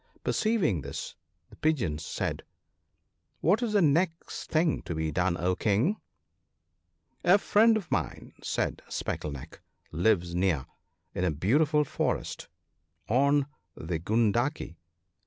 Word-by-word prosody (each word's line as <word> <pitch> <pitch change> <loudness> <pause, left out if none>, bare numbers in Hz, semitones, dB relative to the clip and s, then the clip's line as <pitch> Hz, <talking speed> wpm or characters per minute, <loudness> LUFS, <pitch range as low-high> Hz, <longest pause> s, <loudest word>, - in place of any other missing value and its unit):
Perceiving 195 - +1
this, 70 +1 -6 0.4
the - - -13
Pigeons 100 - 0
said, - - -3 0.5
' - - -48
What 195 - +3
is 230 -3 -1
the 205 -3 +4
next 165 +3 0
thing 160 0 +2
to 85 - -5
be 80 0 -1
done, 90 0 +1
O 90 +2 +1
King? 115 - +1 0.4
' - - -51
* - - -44
A 180 +3 +6
friend 220 +2 +4
of 195 -6 -7
mine/ 80 -8 -2
said - - -2
Speckle 75 - -3
neck, 70 -3 -9 0.2
' - - -38
lives 85 0 +1
near, 90 -6 +1 0.5
in 90 - -2
a 90 - +3
beautiful 145 - +2
forest 145 - -2 0.6
on 140 +4 +3 0.3
the 80 0 -3
Gundaki. 115 - 0
115 Hz, 140 wpm, -28 LUFS, -, 0.6 s, A